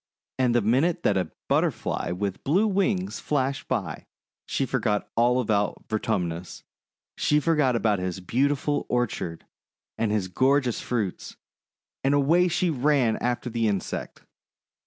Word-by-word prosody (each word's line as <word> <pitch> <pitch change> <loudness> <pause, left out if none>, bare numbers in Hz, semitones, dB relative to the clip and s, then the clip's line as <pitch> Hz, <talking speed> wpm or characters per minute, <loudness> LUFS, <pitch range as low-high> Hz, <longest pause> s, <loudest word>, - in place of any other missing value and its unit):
And 125 -2 +2
the 120 - +3
minute 155 - +2
that 100 - +3
a 90 -4 0 0.2
Butterfly - - 0
with 100 +1 -3
blue 180 +10 +3
wings 195 -1 0
flashed 135 -2 -1
by, 100 -12 -3 0.4
she - - 0
forgot 105 -1 0
all 120 +2 +3
about 105 -4 0
Vertumnus, 90 -6 -2 0.5
she 150 - +2
forgot 150 -5 +2
about 110 -4 +1
his 90 +1 -3
beautiful 140 +9 0
orchard 110 -9 -2 0.5
and 115 -2 +1
his 105 -3 0
gorgeous 130 +5 +2
fruits, 110 -7 -3 0.7
and 135 +2 +3
away 165 +6 +4
she 175 0 +1
ran 135 -4 +2
after 125 +1 -2
the 115 -1 0
insect. 100 -3 -3
120 Hz, 135 wpm, -26 LUFS, 105-145 Hz, 0.7 s, away